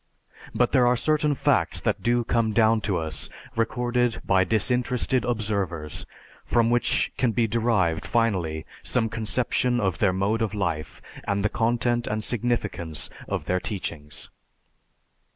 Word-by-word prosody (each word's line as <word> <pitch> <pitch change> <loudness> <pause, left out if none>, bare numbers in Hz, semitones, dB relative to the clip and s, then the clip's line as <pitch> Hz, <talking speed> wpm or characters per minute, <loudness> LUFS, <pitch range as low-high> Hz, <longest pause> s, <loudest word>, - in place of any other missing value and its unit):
But - - +2
there 125 -1 +4
are 125 0 +3
certain 150 +2 +1
facts - - +2
that - - -1
do 120 0 +2
come 115 -1 +1
down 110 0 +4
to 95 - +2
us 80 -3 -4 0.3
recorded 120 +1 0
by 95 0 +4
disinterested 125 +5 +1
observers 100 -9 -2 0.4
from 115 -1 +2
which 120 0 +2
can 120 -3 +1
be 115 +2 +2
derived 110 -7 +1
finally 90 -10 0 0.2
some 115 -3 0
conception 120 +3 0
of 95 -6 0
their 100 - +3
mode 100 +5 0
of 105 -2 -1
life, 85 -6 -3 0.2
and 100 0 0
the - - +3
content 120 +1 0
and 110 0 -2
significance 105 - -2 0.2
of - - -3
their 90 0 +1
teachings. 85 -7 -5
110 Hz, 140 wpm, -25 LUFS, 95-120 Hz, 0.4 s, there